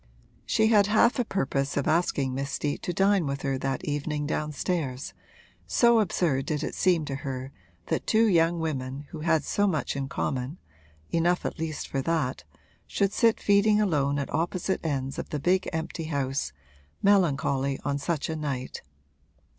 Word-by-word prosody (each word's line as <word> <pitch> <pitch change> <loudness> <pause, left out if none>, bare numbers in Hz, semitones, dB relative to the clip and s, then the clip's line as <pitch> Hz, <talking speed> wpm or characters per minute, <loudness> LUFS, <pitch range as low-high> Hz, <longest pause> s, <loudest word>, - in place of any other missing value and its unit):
She 220 0 +3
had 205 -3 +5
half 225 +4 +4
a - - +3
purpose 140 - -1
of 145 - 0
asking 155 -5 +1
Miss 140 +1 -3
Steet 145 +1 -2
to - - -2
dine 195 -2 +2
with 140 0 -3
her 135 -2 -1
that 135 -1 -2
evening 145 0 -2
downstairs, 150 -2 -2 0.5
so 235 -1 +4
absurd 160 -9 +1
did 150 -1 -1
it - - -3
seem 175 -4 +2
to 135 -2 -3
her 135 -1 -5 0.3
that - - -2
two 225 +1 +4
young 170 -4 +3
women 140 -3 -3
who 160 - -7
had 160 0 +2
so 205 0 +1
much 155 -7 -1
in 135 -1 -3
common 135 +4 -2 0.5
(enough 175 +2 +1
at - - -3
least 160 -2 -3
for 135 - -2
that) 150 - -1 0.4
should 200 0 0
sit 230 -2 +3
feeding 205 +1 +4
alone 145 -8 +1
at 140 - -3
opposite 175 +4 -1
ends 135 -4 -2
of - - -5
the 150 - -3
big 185 +5 +1
empty 160 0 -4
house, 135 - -2 0.5
melancholy 140 -8 +2
on 140 -1 0
such 155 +1 -1
a 160 - -3
night. 140 -5 -4
155 Hz, 170 wpm, -27 LUFS, 140-180 Hz, 0.5 s, had